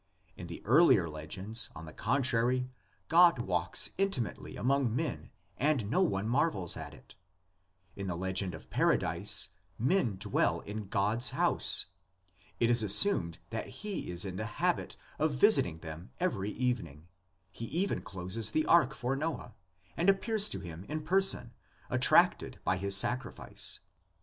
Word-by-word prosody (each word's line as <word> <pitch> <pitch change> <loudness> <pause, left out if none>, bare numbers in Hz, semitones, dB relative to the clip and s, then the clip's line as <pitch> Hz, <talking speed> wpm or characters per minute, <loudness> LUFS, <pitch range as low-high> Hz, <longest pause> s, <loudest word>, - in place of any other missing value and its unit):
In 85 - -8
the 85 - -9
earlier 125 - +5
legends, 95 +9 -2
on 80 0 -9
the 80 - -11
contrary, 125 +1 0 0.4
God 170 -1 +6
walks 95 -7 +2
intimately 195 - -2
among 130 -3 0
men - - -3 0.3
and 135 -7 0
no 180 - +2
one 105 - 0
marvels 120 - 0
at - - -8
it: - - -18 0.8
in 100 -1 -5
the 90 - -2
legend 95 0 -1
of 80 - -14
Paradise - - +1 0.3
men 125 - +1
dwell - - 0
in 105 0 -7
God's 105 +6 +1
house; - - +3 0.7
it 120 0 +3
is 120 -1 +4
assumed 100 - +3
that 115 - -4
he 210 -2 -6
is 90 +2 -3
in 95 -2 -5
the 110 - -3
habit - - -1 0.2
of - - +1
visiting 70 +4 +4
them 80 +5 -9
every 105 - -1
evening; 110 - -3 0.4
he 115 - -7
even 175 - -1
closes 95 +4 -4
the 155 - 0
ark 170 -1 +4
for 125 +2 -2
Noah, 140 -5 -4 0.4
and 175 +4 +2
appears 210 +2 +2
to - - -1
him 85 -2 -8
in 155 +4 -5
person, 195 +4 +1 0.4
attracted - - +3
by 90 - +1
his 100 +1 +2
sacrifice. 125 +5 +1
115 Hz, 145 wpm, -31 LUFS, 95-145 Hz, 0.8 s, God